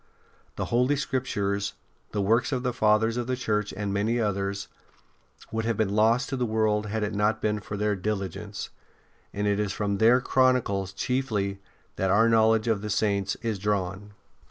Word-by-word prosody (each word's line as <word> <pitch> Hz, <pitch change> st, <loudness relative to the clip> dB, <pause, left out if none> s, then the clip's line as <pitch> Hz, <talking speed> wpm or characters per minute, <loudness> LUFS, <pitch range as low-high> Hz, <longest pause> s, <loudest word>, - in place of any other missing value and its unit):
The -, -, -2 dB
Holy 125 Hz, +4 st, +3 dB
Scriptures, 100 Hz, -8 st, -1 dB, 0.4 s
the 105 Hz, -, -1 dB
works 115 Hz, +6 st, +2 dB
of 130 Hz, -2 st, -1 dB
the 125 Hz, -1 st, 0 dB
Fathers 110 Hz, 0 st, +2 dB
of 120 Hz, -1 st, -2 dB
the 130 Hz, -, 0 dB
Church 105 Hz, -4 st, -1 dB
and 100 Hz, -1 st, -2 dB
many 110 Hz, +4 st, +1 dB
others, 100 Hz, -2 st, -1 dB, 0.8 s
would 110 Hz, 0 st, -1 dB
have 115 Hz, -2 st, 0 dB
been 105 Hz, -2 st, 0 dB
lost 115 Hz, +5 st, +3 dB
to 135 Hz, -, -2 dB
the 125 Hz, -, -1 dB
world 110 Hz, -1 st, +1 dB
had 110 Hz, +1 st, -2 dB
it 105 Hz, 0 st, -2 dB
not 105 Hz, +2 st, +1 dB
been 105 Hz, 0 st, 0 dB
for 105 Hz, 0 st, -6 dB
their 105 Hz, 0 st, +1 dB
diligence; 100 Hz, 0 st, -4 dB, 0.6 s
and 105 Hz, +1 st, -2 dB
it 100 Hz, 0 st, +1 dB
is 105 Hz, -2 st, 0 dB
from 100 Hz, -2 st, -1 dB
their 120 Hz, +3 st, +6 dB
chronicles 125 Hz, -7 st, +2 dB
chiefly 105 Hz, -3 st, -1 dB, 0.4 s
that 95 Hz, -, 0 dB
our 110 Hz, +4 st, +5 dB
knowledge 110 Hz, 0 st, +4 dB
of 110 Hz, -3 st, +1 dB
the 105 Hz, -, -4 dB
Saints 100 Hz, -1 st, 0 dB
is 110 Hz, -4 st, -1 dB
drawn. 100 Hz, 0 st, -2 dB
105 Hz, 180 wpm, -26 LUFS, 100-115 Hz, 0.8 s, their